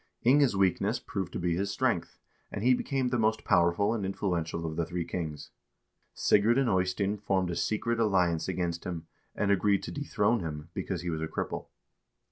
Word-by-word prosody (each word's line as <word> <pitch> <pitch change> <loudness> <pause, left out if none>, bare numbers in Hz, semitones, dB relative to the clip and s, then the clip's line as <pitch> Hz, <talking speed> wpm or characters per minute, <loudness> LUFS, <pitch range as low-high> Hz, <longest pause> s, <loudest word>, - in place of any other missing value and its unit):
Inge's 135 -2 +5
weakness 100 +4 +2
proved 100 -5 -4
to - - -2
be 85 -1 0
his 100 +3 -1
strength, 100 - -1 0.3
and 100 - -4
he 125 +1 +5
became 130 0 0
the 125 -1 0
most 110 0 +1
powerful 90 +3 +3
and 110 -4 -2
influential 85 -4 -2
of 80 -1 -3
the 85 - 0
three 85 0 -3
kings. 80 -4 -5 0.6
Sigurd 110 +4 +3
and 135 -2 +3
Eystein 95 +1 +1
formed 95 -3 0
a - - -3
secret 115 +4 -1
alliance 90 -7 +2
against 85 -2 -2
him, 85 -3 -5 0.3
and 100 -1 +1
agreed 100 0 +2
to - - -5
dethrone 120 -6 +1
him, 80 -2 -6
because 95 -2 -3
he 90 - -2
was 80 -1 -3
a 80 - -1
cripple. - - -4
95 Hz, 185 wpm, -29 LUFS, 85-110 Hz, 0.6 s, Inge's